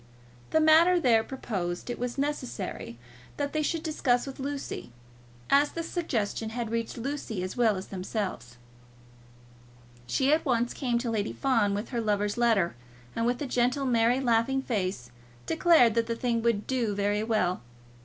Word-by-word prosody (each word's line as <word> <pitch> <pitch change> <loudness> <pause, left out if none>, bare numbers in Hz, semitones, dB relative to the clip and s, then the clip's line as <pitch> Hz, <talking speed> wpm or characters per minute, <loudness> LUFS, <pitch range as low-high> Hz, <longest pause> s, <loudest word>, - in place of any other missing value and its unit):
The 315 - +3
matter 325 +3 +6
there 230 -7 +4
proposed 190 -9 -4
it 240 - -6
was 245 +1 -3
necessary 255 - -4 0.4
that 285 -1 -2
they 310 - +1
should 320 +1 -1
discuss 250 -6 +1
with 275 -1 -8
Lucy, 275 - -5 0.6
as 285 +1 +4
the 335 - -3
suggestion 230 - -2
had 230 -1 -4
reached 230 0 -2
Lucy 235 -6 -4
as 185 - -5
well 230 -4 +3
as 190 0 -7
themselves. 185 - -4 1.5
She 265 - +2
at 315 - +2
once 240 -3 +1
came 245 -4 -1
to 235 -1 -2
Lady 215 -2 -1
Fawn 225 -7 +1
with 205 +3 -4
her 240 -3 -2
lover's 205 -1 0
letter, 225 - +2 0.4
and 230 0 0
with 245 0 0
a - - -2
gentle 250 +2 +1
merry 240 0 +3
laughing 260 +1 +1
face 185 - -2 0.3
declared 320 -9 +5
that 230 0 +1
the 230 - -1
thing 230 -1 0
would 225 -3 +1
do 235 -6 -1
very 205 +1 0
well. 215 -5 0
235 Hz, 165 wpm, -28 LUFS, 210-270 Hz, 1.5 s, matter